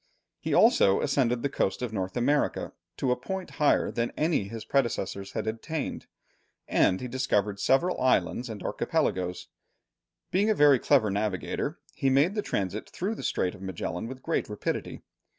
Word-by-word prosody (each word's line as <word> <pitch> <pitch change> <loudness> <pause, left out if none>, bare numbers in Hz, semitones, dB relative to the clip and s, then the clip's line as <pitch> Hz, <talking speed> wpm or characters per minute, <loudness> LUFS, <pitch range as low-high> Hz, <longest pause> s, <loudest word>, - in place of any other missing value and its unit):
He - - -4
also 95 0 +5
ascended 125 -4 +1
the - - +2
coast 125 -3 -1
of 115 -3 -3
North 95 -1 -3
America 140 +4 +1 0.2
to 130 - 0
a - - +3
point 190 +9 -5
higher 150 - +3
than 115 0 -1
any 155 - +1
his 115 +1 -7
predecessors 100 -7 -1
had - - -2
attained, 135 +8 -4 0.6
and 95 - +3
he 125 - -4
discovered 105 -6 0
several 170 - +2
islands 120 -1 +1
and 105 -3 -7
archipelagos. 90 -1 -1 0.8
Being 200 +4 +2
a 215 - +3
very 145 -5 +6
clever 120 -8 +3
navigator, 100 -2 -2 0.2
he 135 - +1
made 140 +8 +3
the 210 - -1
transit 100 - -3
through 195 +5 -3
the - - -7
Strait 90 - 0
of 100 - -13
Magellan 95 +1 -4
with 130 +1 -9
great 165 - -1
rapidity. 105 - -4
120 Hz, 165 wpm, -28 LUFS, 100-140 Hz, 0.8 s, very